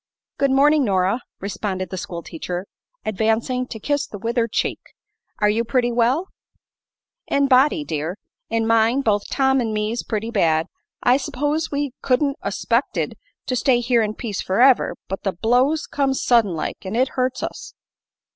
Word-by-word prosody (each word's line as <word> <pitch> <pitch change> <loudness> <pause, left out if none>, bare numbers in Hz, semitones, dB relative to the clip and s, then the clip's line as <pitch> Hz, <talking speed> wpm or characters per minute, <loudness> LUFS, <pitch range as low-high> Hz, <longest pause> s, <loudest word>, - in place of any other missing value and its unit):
"Good 275 - +3
morning, 285 +2 +4
Nora," 195 +2 +1 0.2
responded 190 -2 -4
the - - -3
schoolteacher, 175 +1 -5 0.4
advancing 225 +4 0
to 220 - -7
kiss 290 +6 -1
the 205 - -8
withered 230 +2 -1
cheek. - - -1 0.6
"Are 210 - +2
you 215 +3 +2
pretty 245 +1 +1
well?" 245 +10 +1 1.0
"In 280 0 +2
body, 275 +4 +4
dear. 160 - -3 0.3
In 225 0 0
mind 230 +4 +3
both 205 -3 +1
Tom 265 -1 +2
'n' 225 -2 -2
me's 215 +2 -1
pretty 225 +1 -3
bad. 165 -7 +2 0.4
I 245 +2 +5
s'pose 290 +3 -1
we 285 -1 -2
couldn't 275 +2 +1
'a - - -2
'spected - - 0 0.3
to 255 - -1
stay 250 0 +3
here 240 -1 +2
in 215 -1 -1
peace 215 -6 -4
forever; 245 +7 +3
but 195 - -4
the 195 - -1
blow's 250 - +2
come 275 -2 0
suddin 230 -9 +3
like, 155 - -4
an' 190 +2 -4
it 260 +2 +2
hurts 255 0 -1
us." - - -6
235 Hz, 160 wpm, -22 LUFS, 205-265 Hz, 1.0 s, I